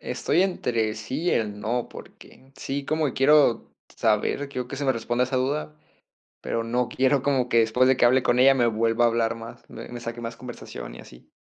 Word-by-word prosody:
Estoy 175 +4 0
entre 115 - -1
sí 130 +8 -5
y 175 - +1
el 105 -2 -1
no, 115 +3 -2
porque, 135 +1 -15
sí 140 +1 -4
como 155 -3 -1
quiero 140 -2 +3 0.2
saber, 115 +6 0
quiero 125 -3 -5
que 135 - -6
se 145 - -3
me 130 - +3
responda 120 +2 -1
esa 130 +1 -5
duda, 145 +4 -2 0.7
pero 115 - -2
no 120 +2 -1
quiero 135 +1 +1
como 130 -3 +1
que 115 - +2
después 125 +3 +2
de 130 -1 +3
que 120 - +4
hable 130 +2 +4
con 120 -1 +1
ella 135 +2 +6
me 120 -3 +2
vuelva 115 +1 +1
a - - +5
hablar 115 -1 0
más 115 0 -11
me - - -10
me 120 0 -7
saque 120 0 -6
más 115 0 -6
conversación - - -9
y - - -12
así. - - -15
125 Hz, 215 wpm, -25 LUFS, 115-135 Hz, 0.7 s, ella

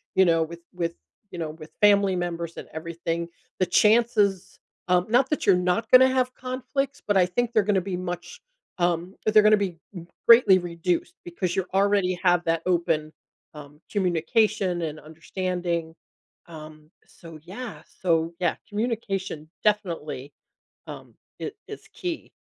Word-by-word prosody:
you 190 - +6
know, 165 -1 +3
with 170 +1 -8 0.2
with, 170 -1 -2 0.4
you 175 - -7
know, 160 -2 -3
with 155 0 -12
family 200 -2 +5
members 170 -1 -4
and - - -8
everything, 170 +1 -4 0.3
the 185 - +3
chances 210 -1 +2 0.3
um, 180 0 +2
not 250 +3 +3
that 300 - -1
you're 190 - +7
not 180 +5 0
gonna 260 +1 +8
have 255 -1 0
conflicts, 265 +2 -3
but 205 -2 +3
I 180 - +5
think 235 +6 -1
they're 215 -3 +4
gonna 195 -2 +1
be 185 -1 -4
much, 175 -1 -6 0.4
um, 175 +1 -1
they're 215 0 +6
gonna 215 0 +6
be 185 -4 -3 0.2
m 170 -1 -8 0.2
greatly 225 -5 +8
reduced 175 0 -2
because 175 0 -3
you 190 -1 0
already 195 -2 +2
have 175 -1 +3
that 165 0 +1
open, 165 -3 0 0.4
um, 150 +1 -12
communication 185 0 +1
and 155 -1 -4
understanding. 170 +1 -4 0.5
Um, 155 -1 -12 0.2
so, 165 -3 -13
yeah, 215 +6 -8 0.2
so, 165 -1 +1
yeah, 175 -3 +1
communication 200 -8 -3
definitely, 165 -9 -1 0.6
um, - - -9 0.3
i - - -3 0.2
is 425 - -9
key. 345 -3 -5
180 Hz, 150 wpm, -25 LUFS, 170-210 Hz, 0.6 s, gonna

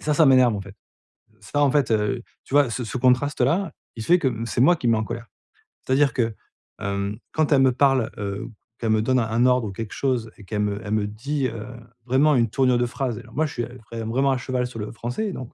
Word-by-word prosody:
et - - -13
ça, 150 - +1
ça 160 +2 +5
m'énerve 130 -4 +5
en 100 - -3
fait. 100 +1 -11 0.6
Ça 145 0 -1
en 140 - +4
fait, 140 -3 +1
heu, 110 +3 0 0.2
tu - - -8
vois? 145 -3 +5
Ce 125 +1 -3
ce 115 - -4
contraste-là, 135 +7 +2 0.2
il 110 - -5
fait 175 +6 +5
que 135 -6 +1 0.2
c'est 120 - -2
moi 175 +5 +5
qui 125 - -1
me 115 - +5
mets 110 - +2
en 110 - -1
colère. 115 +1 -6 0.6
C'est-à-dire 135 0 +3
que, 115 -3 0 0.4
hem, 100 +1 -3 0.2
quand 155 -1 +1
elle 135 -2 +5
me 130 - +5
parle, 135 -2 +2
heu, 100 +1 -4 0.3
qu'elle 115 - -1
me 110 0 +3
donne 130 +3 +2
un 115 +1 +1
ordre 125 -3 +3
ou - - -6
quelque 105 +2 -6
chose 120 -5 -1
et 105 - -13
qu'elle 105 +1 -2
me 105 +1 -1
elle 100 - -5
me 105 -1 +1
dit, 135 +6 -2
heu, 115 -2 -6 0.4
vraiment 140 +4 +3
une 115 -3 +2
tournure 125 +1 +2
de 120 - +1
phrase, 120 -2 -3
alors - - -14
moi 155 +3 +2
je 150 - -5
suis, 120 - -2
heu, 125 +2 -9
vrai 115 -1 -4
vraiment 130 +5 +1
à 130 - +1
cheval 125 0 -2
sur 120 -2 -9
le 105 - -5
français 120 - -3
et - - -5
donc, 130 -6 -8
125 Hz, 260 wpm, -23 LUFS, 110-135 Hz, 0.6 s, ça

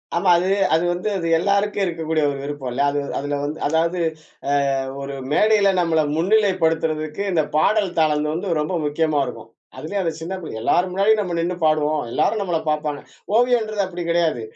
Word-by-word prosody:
ஆமா 180 +2 +2
அது 185 +2 0 0.2
அது 165 +2 +3
வந்து, 180 +4 -4
அது 165 -2 -3
எல்லாருக்கு 200 +3 +1
இருக்கக்கூடிய 160 -2 -1
ஒரு 140 - -5
விருப்பம் 145 -3 -5
இல்ல. 135 - -1
அது 145 - -1 0.2
அதில 145 0 -2
வந்து 150 +2 -4
அதாவது 165 +3 0 0.5
அ - - +1 0.5
ஒரு 140 0 -5 0.2
மேடையில 210 +2 +4
நம்மள 165 -2 +2 0.2
முன்னிலைப்படுத்துறதுக்கு 165 -4 +1
இந்த 160 -3 +2
பாடல் 200 +2 +2
தளம் 150 -1 +2
வந்து 170 -1 -1
ரொம்ப 155 +4 -2
முக்கியமா 150 0 0
இருக்கும். 115 - -9 0.3
அதுலயும் 185 +8 -3
அந்த 165 -2 -1
சின்ன 175 +4 -4
பிள்ளை 135 -9 -7
எல்லார் 180 +9 +2
முன்னாடியும் 210 +3 +3
நம்ம 175 -3 -3
நின்னு 175 +2 -1
பாடுவோம். 155 0 +2
எல்லாரும் 215 - +1
நம்மள 175 -4 -1
பார்ப்பாங்க 150 -1 -1 0.4
ஓவியம்ன்றது 225 -4 +2
அப்படி 175 -1 -6
கிடையாது. 165 -8 +1
165 Hz, 170 wpm, -21 LUFS, 155-190 Hz, 0.5 s, மேடையில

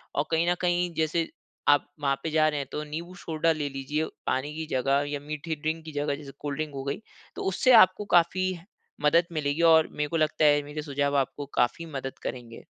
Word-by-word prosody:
और 145 - +1
कहीं 165 +2 +2
न - - +2
कहीं, 175 -1 +1
जैसे 160 +1 0 0.4
आप 145 -1 +5 0.2
वहाँ 140 -1 +2
पे 160 - -1
जा 155 0 +4
रहे 150 -1 -2
हैं, 140 - -4
तो 150 - -3
नींबू 165 +4 -6
सोडा 165 -1 0
ले 150 -2 -3
लीजिए, 135 +3 -2 0.2
पानी 135 +3 -1
की 160 0 -4
जगह 135 +2 +2
या 145 -1 -3
मीठी 150 +2 -4
ड्रिंक 155 +2 -3
की 155 - -7
जगह 145 0 -1
जैसे 140 -1 -10
कोल्ड 145 -1 -4
ड्रिंक 155 -2 -3
हो 135 - -4
गई। 140 +8 -3 0.3
तो - - -5
उससे 255 +7 +3
आपको 185 +3 -2
काफ़ी 185 +2 +3 0.5
मदद 165 +4 +4
मिलेगी 150 +1 -1
और 160 -1 +5
मेरे 150 0 -2
को 165 - 0
लगता 155 0 +2
है, 145 0 +5
मेरे 145 +1 -6
सुझाव 140 -1 0
आपको 140 +1 -1
काफ़ी 125 +7 +1
मदद 135 0 -6
करेंगे। 120 -2 -6
150 Hz, 215 wpm, -27 LUFS, 145-160 Hz, 0.5 s, आप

